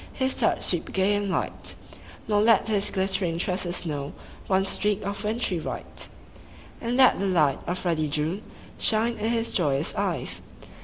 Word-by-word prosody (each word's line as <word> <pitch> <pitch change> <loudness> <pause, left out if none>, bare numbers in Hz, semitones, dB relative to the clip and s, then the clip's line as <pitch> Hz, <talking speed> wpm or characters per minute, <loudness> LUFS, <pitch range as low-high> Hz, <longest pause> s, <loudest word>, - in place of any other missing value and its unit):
His 260 -1 0
touch 230 - +1
sweep 175 -3 0
gay 190 +2 +3
and 205 -1 -1
light; - - -2 0.5
Nor 205 -1 +3
let 225 +1 +4
his 205 -1 +3
glittering 190 -3 0
tresses 180 -1 -1
know 145 -3 -4 0.3
One 190 0 +2
streak 205 +1 0
of 200 +1 -4
wintry 210 -4 -1
white. - - -6 0.7
And 240 +1 -1
let 260 -1 +6
the 200 - 0
light 155 -7 +2
of 180 +2 -3
ruddy 160 -3 +1
June 155 +7 -1 0.4
Shine 230 +1 +2
in 220 +2 0
his 230 -1 0
joyous 145 -7 +1
eyes. - - -1
195 Hz, 160 wpm, -26 LUFS, 170-215 Hz, 0.7 s, let